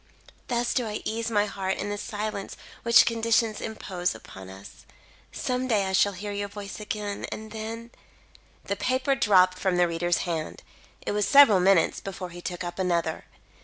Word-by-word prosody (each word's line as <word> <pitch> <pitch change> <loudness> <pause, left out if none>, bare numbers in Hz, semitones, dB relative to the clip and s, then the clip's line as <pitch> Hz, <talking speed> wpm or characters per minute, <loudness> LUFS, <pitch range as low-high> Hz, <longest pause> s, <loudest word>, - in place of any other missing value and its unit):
"Thus 240 -1 0
do 245 -3 0
I 210 0 -5
ease 230 +1 -2
my 210 -2 +2
heart 190 -2 -3
in 205 +1 -3
the 205 - -3
silence 210 -2 -4 0.2
which 235 0 +6
conditions 230 -1 +1
impose 185 - -3
upon 95 -3 -11
us. 95 +1 -12 0.5
Some 255 0 -2
day 210 -5 +2
I 190 - -3
shall 200 +1 +3
hear 205 +3 -6
your 205 0 -3
voice 200 0 -8
again, 210 -1 -4
and 220 0 -7
then 225 +2 -6 0.4
" - - -33 0.3
The - - -1
paper 260 +2 +1
dropped 185 -7 +4
from 185 -2 +1
the 175 0 +4
reader's 175 +1 0
hand. 165 -3 -4 0.4
It - - -1
was 205 0 +1
several 275 -9 +8
minutes 185 -2 +3
before 185 -2 -7
he 175 +1 -9
took 175 0 -4
up 175 +2 -6
another. 170 -3 0
205 Hz, 180 wpm, -26 LUFS, 180-225 Hz, 0.5 s, several